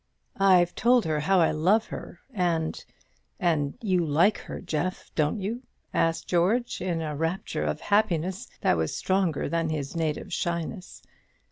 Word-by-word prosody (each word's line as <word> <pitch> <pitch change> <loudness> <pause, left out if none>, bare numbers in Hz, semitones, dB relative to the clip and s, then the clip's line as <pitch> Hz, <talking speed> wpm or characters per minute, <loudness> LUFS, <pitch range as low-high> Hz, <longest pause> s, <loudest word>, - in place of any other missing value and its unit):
"I've 185 -3 +5
told 240 0 +3
her 155 -1 0
how 190 +5 +3
I 165 - +4
love 185 +9 +3
her; - - -8
and 170 -5 -1 0.6
and 155 -5 +1
you 185 -4 +2
like 165 +7 +3
her, - - -7
Jeff, 175 +1 -3
don't 155 +6 +1
you?" 220 +6 -3 0.3
asked 165 0 +1
George, 195 +8 +1
in 175 -3 -1
a 150 -1 -3
rapture 165 +5 -2
of - - -2
happiness 190 -3 0
that - - +3
was 80 -1 -1
stronger 185 -5 0
than 165 -1 0
his 150 -1 -3
native 160 -2 -2
shyness. 170 +2 -3
175 Hz, 150 wpm, -27 LUFS, 160-190 Hz, 0.6 s, I've